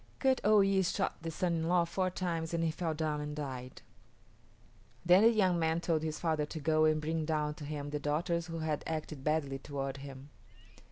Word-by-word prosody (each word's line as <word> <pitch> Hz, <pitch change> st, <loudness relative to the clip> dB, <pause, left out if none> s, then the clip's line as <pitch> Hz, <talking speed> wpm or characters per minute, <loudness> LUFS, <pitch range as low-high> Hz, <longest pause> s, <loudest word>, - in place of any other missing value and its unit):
Kut 265 Hz, -1 st, +2 dB
o 210 Hz, 0 st, +6 dB
yis´ 195 Hz, -2 st, +2 dB
shot 190 Hz, -3 st, -2 dB
the 165 Hz, -, -4 dB
son 170 Hz, +2 st, -1 dB
in 160 Hz, 0 st, -1 dB
law 175 Hz, 0 st, +3 dB
four 185 Hz, +2 st, -1 dB
times 170 Hz, -3 st, -2 dB
and 165 Hz, -, 0 dB
he 165 Hz, -, +1 dB
fell 165 Hz, -1 st, -2 dB
down 150 Hz, -1 st, -1 dB
and 150 Hz, 0 st, -5 dB
died. 130 Hz, -4 st, -6 dB, 1.2 s
Then 180 Hz, +3 st, +7 dB
the 225 Hz, -, +7 dB
young 190 Hz, -6 st, +2 dB
man 160 Hz, 0 st, +1 dB
told 165 Hz, -2 st, 0 dB
his 155 Hz, -1 st, -3 dB
father 155 Hz, -3 st, 0 dB
to 160 Hz, -, -6 dB
go 155 Hz, +1 st, +3 dB
and 155 Hz, 0 st, +3 dB
bring 160 Hz, +1 st, -1 dB
down 150 Hz, -1 st, 0 dB
to 150 Hz, -, -9 dB
him 145 Hz, -1 st, -5 dB
the 150 Hz, -, -2 dB
daughters 160 Hz, +3 st, -1 dB
who 165 Hz, -1 st, -5 dB
had 155 Hz, -2 st, -2 dB
acted 155 Hz, -3 st, -4 dB
badly 145 Hz, -3 st, 0 dB
toward 135 Hz, -1 st, -4 dB
him. 135 Hz, +1 st, -10 dB
160 Hz, 210 wpm, -32 LUFS, 150-170 Hz, 1.2 s, Then